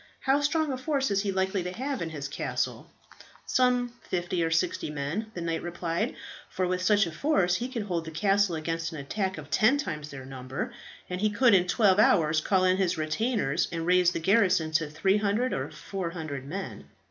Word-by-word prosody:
How 275 +2 +2
strong 305 +1 +1
a 260 - -3
force 270 -3 0
is 200 0 +2
he 200 -1 -1
likely 190 0 0
to 180 +1 -4
have 265 +7 -3
in 165 - -2
his 145 -3 -5
castle?" 140 - -3 0.6
"Some 250 -1 +2
fifty 175 -1 -2
or 165 - +1
sixty 165 0 0
men," 150 +9 -3
the 175 - -4
knight 165 -1 -2
replied; 170 -1 -2 0.3
"for 185 - -1
with 180 0 -1
such 205 +2 +4
a 170 - -5
force 180 - +1
he 245 +2 -4
could 235 -4 -3
hold 175 -5 -2
the - - -5
castle 195 +2 +2
against 165 +1 -3
an 160 - -7
attack 190 +6 -3
of 155 -1 -10
ten 240 +7 +4
times 155 - -4
their 135 -2 -9
number, 130 +2 -5 0.3
and 180 +1 -4
he 215 - +3
could 230 +2 +4
in 180 -2 +4
twelve 200 -1 +3
hours 160 -7 +4
call 185 +2 +2
in 185 0 +3
his 180 -3 +1
retainers, 155 - 0
and 165 -1 -3
raise 180 0 +4
the 165 - -3
garrison 185 -3 +3
to 155 -1 +1
300 205 +9 +1
or - - -2
400 165 -8 -5
men." 190 +6 -6
180 Hz, 200 wpm, -28 LUFS, 165-210 Hz, 0.6 s, such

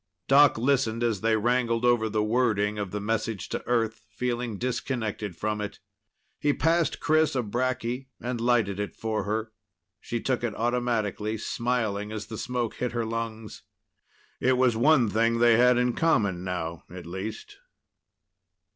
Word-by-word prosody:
Doc 140 0 +6
listened 120 -2 +1
as 110 -5 0
they 110 0 +2
wrangled 120 +1 +1
over 120 -2 +3
the 105 0 0
wording 105 -2 +1
of 100 -2 -3
the 105 - -4
message 110 -1 -2
to - - -3
Earth, 115 -2 0
feeling 120 0 -3
disconnected 120 -5 -3
from 105 +4 -2
it. 105 - -5 0.6
He 145 -1 +2
passed 165 +1 +1
Chris 155 -1 +2
a 125 - +1
bracky 125 +3 -2
and 120 -1 -3
lighted 115 -5 +2
it 105 - -4
for 110 -1 -2
her. 110 +2 -2 0.5
She 120 - -4
took 125 -1 -1
it 115 -3 -2
automatically, 115 -3 -1
smiling 110 -3 -2
as 105 -2 -5
the 110 0 -7
smoke 125 -3 -2
hit 125 -1 -2
her 120 -1 -1
lungs. 115 -1 -5 0.8
It 130 0 +2
was 125 -2 +3
one 130 +1 +4
thing 115 +2 +2
they 120 -1 +5
had 125 0 +5
in 125 0 +2
common 100 - +1
now, 85 -3 -4
at 90 -1 -9
least. 95 +5 -7
115 Hz, 155 wpm, -27 LUFS, 105-125 Hz, 0.8 s, Doc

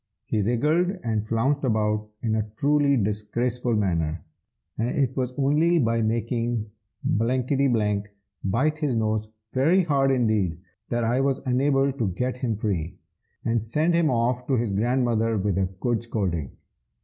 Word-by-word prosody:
He 110 - 0
wriggled 155 - +1
and 110 -2 -1
flounced 130 +6 +1
about 105 -3 0
in 110 -2 0
a 110 -1 -1
truly 145 -1 +3
disgraceful 120 +3 -1
manner, 85 -6 0 0.6
and 115 +2 +1
it 130 -3 0
was 130 -2 -1
only 150 +5 +3
by 115 -5 +2
making 115 0 -1 0.4
Bmfkgth 115 -3 +1 0.4
bite 135 +11 +1
his 145 -6 0
nose 110 -1 0 0.3
very 165 +9 +4
hard 140 -4 +2
indeed 110 -10 +1 0.3
that 120 -1 0
I 120 +3 +2
was 135 -1 +1
enabled 135 +1 +1
to 115 - +1
get 125 +8 -2
him 120 -5 -2
free, 95 -7 -2 0.5
and 115 -1 +1
send 155 +10 +1
him 170 -2 +3
off 125 +1 0
to 135 - 0
his 115 -3 0
grandmother 115 0 +1
with 100 -1 0
a 95 -1 +1
good 120 0 0
scolding. 95 - -2
120 Hz, 150 wpm, -25 LUFS, 110-135 Hz, 0.6 s, very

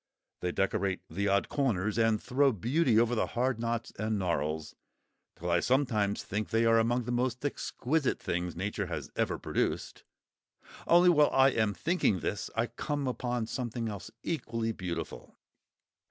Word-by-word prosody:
They 90 - -1
decorate 95 0 0
the 100 +5 -1
odd 100 0 +2
corners, 110 -7 0
and 115 -1 +3
throw 135 +4 +2
beauty 120 - +2
over 120 +1 +2
the 115 - +1
hard 125 -1 +1
knots 115 0 -2
and 110 0 0
gnarls, 80 -4 -1 0.6
till 85 +1 -3
I 85 - +4
sometimes 110 -5 +1
think 105 +2 -3
they 115 0 +2
are 115 0 +5
among 120 +2 +1
the 120 - -4
most 125 +2 -1
exquisite 145 0 -1
things 85 0 -2
Nature 100 +4 -2
has - - -5
ever - - 0
produced—only 175 +1 -1
while 150 -4 +5
I 135 0 +5
am 110 -5 0
thinking 130 - +1
this, 105 - -3
I 115 +1 +2
come 145 +2 -3
upon 125 -2 -2
something 120 -1 -3
else 100 -2 -7
equally 115 -8 -2
beautiful. 90 -5 -6
115 Hz, 155 wpm, -30 LUFS, 100-130 Hz, 0.6 s, are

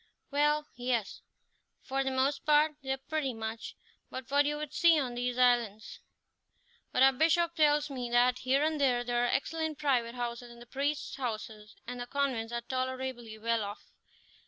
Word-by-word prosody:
"Well, 295 +1 +2
yes, 245 -4 -2 0.6
for 270 +1 -1
the 270 - -1
most 265 +2 0
part 300 +1 +4
they 265 - -8
are 265 - 0
pretty 270 -2 -3
much 225 0 -5 0.3
what 280 +3 +1
you 295 0 -1
would 300 -1 -6
see 335 -2 +5
on 255 -4 -2
these 245 0 -2
islands; 240 -4 +2 0.9
but 255 - +3
our 270 0 +7
Bishop 330 +4 +2
tells 300 -2 +3
me 250 -3 -4
that, 245 +1 +3
here 265 +3 +2
and 310 -1 0
there, 245 -3 +3
there 240 0 0
are - - 0
excellent 315 +2 -1
private 255 -5 +1
houses, 240 0 -4
and 235 0 -13
the 240 - -12
priests' 280 +3 -2
houses 215 -4 -5
and 245 +1 -6
the 245 - -5
convents 255 -5 -1
are 235 0 -2
tolerably 255 -2 -4
well 230 0 0
off. 205 +1 -8
260 Hz, 175 wpm, -31 LUFS, 240-290 Hz, 0.9 s, our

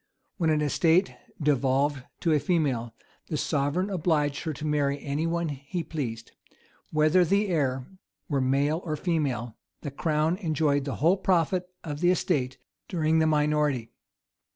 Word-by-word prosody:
When 165 -3 +1
an 155 -1 +2
estate 165 +5 +3 0.3
devolved 140 -1 +1 0.2
to 165 - +2
a 150 - +4
female, 135 -10 0 0.3
the 155 - -2
sovereign 150 +7 0
obliged 155 -5 0
her 160 - -1
to 150 - -7
marry 145 -2 +1
anyone 165 +4 -1
he 145 +5 -4
pleased: 125 -8 -5 0.6
whether 155 +4 +4
the 200 +4 +1
heir 135 -6 0 0.4
were 140 -3 0
male 140 +5 +1
or 155 -3 -2
female, 135 -10 -2 0.2
the 145 - -5
crown 155 +4 0
enjoyed 155 -6 0
the 140 - -3
whole 170 +6 +3
profit 180 -1 +1
of 150 -3 -5
the 175 - +3
estate 145 -8 0 0.3
during 160 -3 +1
the 160 - +3
minority. 150 -5 +1
150 Hz, 145 wpm, -27 LUFS, 140-165 Hz, 0.6 s, a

